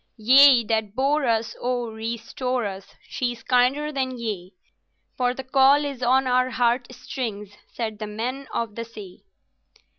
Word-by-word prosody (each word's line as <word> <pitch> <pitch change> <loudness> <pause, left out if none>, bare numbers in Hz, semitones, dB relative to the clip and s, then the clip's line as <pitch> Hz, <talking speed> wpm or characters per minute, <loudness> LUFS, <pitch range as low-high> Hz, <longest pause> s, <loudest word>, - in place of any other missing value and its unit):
"'Ye 255 +2 +7
that 220 -2 -1
bore 275 +1 +1
us, 225 -1 0
O 245 -2 -2
restore 230 +2 -3
us! 195 -1 -7
She 245 -2 -2
is 230 -1 -15
kinder 260 +5 +2
than 260 -3 -2
ye; 205 -6 -5 0.6
For 250 0 0
the 265 - -6
call 270 +2 +4
is 275 -3 -5
on 260 +2 +3
our 255 0 +2
heart 245 0 +1
strings!' 225 -5 -6 0.2
Said 220 -3 -5
The 215 - -4
Men 250 +6 -4
of 230 -3 -3
the 230 - -5
Sea." 210 -5 -12
245 Hz, 155 wpm, -24 LUFS, 220-260 Hz, 0.6 s, Ye